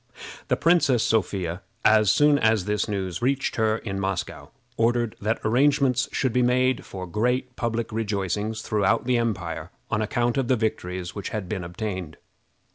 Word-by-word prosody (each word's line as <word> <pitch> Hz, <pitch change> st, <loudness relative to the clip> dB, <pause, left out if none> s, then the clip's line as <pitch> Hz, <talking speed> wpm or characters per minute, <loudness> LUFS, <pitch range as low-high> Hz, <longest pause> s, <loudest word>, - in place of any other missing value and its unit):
The -, -, +1 dB
Princess 160 Hz, -9 st, +3 dB
Sophia, 95 Hz, -4 st, 0 dB, 0.2 s
as 110 Hz, -2 st, +5 dB
soon 145 Hz, +6 st, +4 dB
as 110 Hz, -4 st, +2 dB
this 105 Hz, +1 st, 0 dB
news 95 Hz, -3 st, -3 dB
reached 135 Hz, +2 st, 0 dB
her 110 Hz, -1 st, +2 dB
in 95 Hz, -3 st, -5 dB
Moscow, 95 Hz, -2 st, -3 dB, 0.3 s
ordered 120 Hz, -1 st, +1 dB
that 110 Hz, +2 st, 0 dB
arrangements 130 Hz, +1 st, +3 dB
should 130 Hz, -4 st, 0 dB
be 125 Hz, -, +3 dB
made 130 Hz, +1 st, +2 dB
for 95 Hz, -1 st, -7 dB
great 125 Hz, +7 st, -1 dB
public 115 Hz, -1 st, -2 dB
rejoicings 105 Hz, 0 st, -2 dB
throughout 110 Hz, +3 st, +1 dB
the 125 Hz, -1 st, +2 dB
empire 90 Hz, -8 st, -3 dB, 0.2 s
on 105 Hz, -, +1 dB
account 120 Hz, +2 st, 0 dB
of 130 Hz, -, 0 dB
the 130 Hz, -, +3 dB
victories 90 Hz, -5 st, -3 dB
which 100 Hz, -, -5 dB
had 105 Hz, -4 st, -4 dB
been 95 Hz, -1 st, -3 dB
obtained. 90 Hz, -3 st, -5 dB
110 Hz, 160 wpm, -25 LUFS, 95-125 Hz, 0.3 s, as